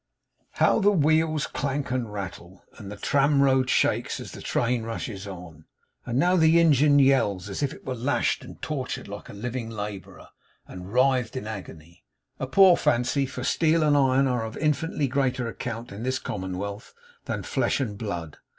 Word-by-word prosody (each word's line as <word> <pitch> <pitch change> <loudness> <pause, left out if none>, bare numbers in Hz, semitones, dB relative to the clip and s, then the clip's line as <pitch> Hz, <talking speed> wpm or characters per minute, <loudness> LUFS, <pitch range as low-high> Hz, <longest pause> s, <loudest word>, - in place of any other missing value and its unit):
How - - +3
the 205 -1 +4
wheels 155 -3 +2
clank 140 -1 -3
and 125 -4 -2
rattle, 95 -2 -8 0.2
and 100 -1 -8
the - - -6
tram 140 +6 +2
road 130 -2 +3
shakes, - - +1
as - - -8
the - - -10
train 120 0 0
rushes 110 -3 -5
on! 85 -5 -10 0.4
And 120 0 -1
now 180 +6 +3
the 160 0 +5
engine 150 -3 +5
yells, 130 -9 +3
as 100 - -5
it 140 +1 -3
were 130 - -2
lashed 125 +4 0
and - - -12
tortured 140 -5 -4
like 100 0 -9
a - - -9
living 120 +2 -5
labourer, 105 -3 -7 0.4
and 90 +1 -9
writhed 130 0 +2
in 130 - -5
agony. 85 - -9 0.4
A 130 - -3
poor 185 +4 +6
fancy; 130 +3 +1
for 125 -1 -6
steel 160 +3 +2
and 150 -1 +3
iron 135 -1 +3
are 125 -3 0
of 110 0 -6
infinitely 150 -1 0
greater 130 -2 0
account, 115 0 -6
in 100 +2 -8
this 130 +2 -1
commonwealth, 100 0 -5 0.3
than - - -3
flesh - - 0
and 115 -7 -2
blood. 90 -8 -5
125 Hz, 175 wpm, -25 LUFS, 105-140 Hz, 0.4 s, poor